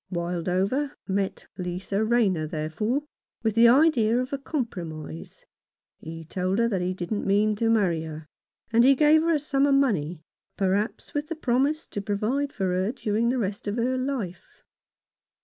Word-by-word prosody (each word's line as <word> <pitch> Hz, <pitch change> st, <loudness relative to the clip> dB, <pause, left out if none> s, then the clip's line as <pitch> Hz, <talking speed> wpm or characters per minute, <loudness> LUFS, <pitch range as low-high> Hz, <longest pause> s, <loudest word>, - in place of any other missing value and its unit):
Wildover 185 Hz, -, -1 dB
met 195 Hz, 0 st, -2 dB
Lisa 185 Hz, +3 st, -2 dB
Rayner, 210 Hz, -9 st, +2 dB
therefore, 160 Hz, -, -2 dB, 0.4 s
with 220 Hz, -1 st, +1 dB
the 230 Hz, +2 st, +6 dB
idea 245 Hz, -4 st, +4 dB
of 255 Hz, +2 st, -2 dB
a 275 Hz, -, -1 dB
compromise. 170 Hz, -, -6 dB, 0.5 s
He 165 Hz, 0 st, -8 dB
told 185 Hz, +3 st, -1 dB
her 230 Hz, 0 st, +3 dB
that 195 Hz, -5 st, -1 dB
he 180 Hz, +1 st, -1 dB
didn't 190 Hz, +4 st, -3 dB
mean 210 Hz, +2 st, +3 dB
to 225 Hz, +1 st, +1 dB
marry 190 Hz, -8 st, +2 dB
her, 155 Hz, 0 st, -8 dB, 0.5 s
and 230 Hz, +1 st, +6 dB
he 270 Hz, +2 st, +6 dB
gave 305 Hz, +2 st, +5 dB
her 330 Hz, 0 st, +2 dB
a -, -, +1 dB
sum 280 Hz, -1 st, +1 dB
of 280 Hz, -, +4 dB
money, 175 Hz, -, +1 dB, 0.3 s
perhaps 200 Hz, +3 st, -1 dB
with 295 Hz, +1 st, -2 dB
the 330 Hz, -, -4 dB
promise 285 Hz, +3 st, 0 dB
to 205 Hz, -, -5 dB
provide 220 Hz, +8 st, -1 dB
for 190 Hz, -6 st, -2 dB
her 185 Hz, +4 st, 0 dB
during 235 Hz, -2 st, 0 dB
the 255 Hz, -, 0 dB
rest 205 Hz, -3 st, -3 dB
of 205 Hz, -, -1 dB
her 245 Hz, +2 st, 0 dB
life. 255 Hz, -9 st, -4 dB
215 Hz, 165 wpm, -26 LUFS, 185-260 Hz, 0.5 s, the